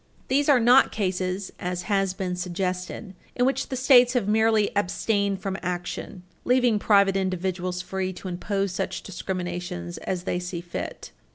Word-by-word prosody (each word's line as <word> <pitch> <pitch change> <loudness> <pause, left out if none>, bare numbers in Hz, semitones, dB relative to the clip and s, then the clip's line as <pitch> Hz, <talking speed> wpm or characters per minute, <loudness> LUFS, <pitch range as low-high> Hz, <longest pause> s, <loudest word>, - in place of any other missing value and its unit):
These 280 +3 +2
are 275 -3 +6
not 245 +3 +6
cases, 185 -1 -2
as 180 0 -3
has 195 -1 0
been 185 -2 -2
suggested, 180 +2 -3 0.2
in 245 - +2
which 270 +1 0
the 260 - -2
States 250 -1 +6
have 240 -6 0
merely 220 0 +3
abstained 200 0 0
from 195 -1 -2
action, 180 +1 -5 0.2
leaving 245 -4 +3
private 200 -2 +4
individuals 185 -1 -2
free 185 0 -3
to 185 - -8
impose 195 +2 -2
such 185 - -3
discriminations 175 - -5
as 180 -2 -3
they 180 - -1
see 180 -1 -5
fit. 175 0 -6
190 Hz, 155 wpm, -25 LUFS, 180-215 Hz, 0.2 s, are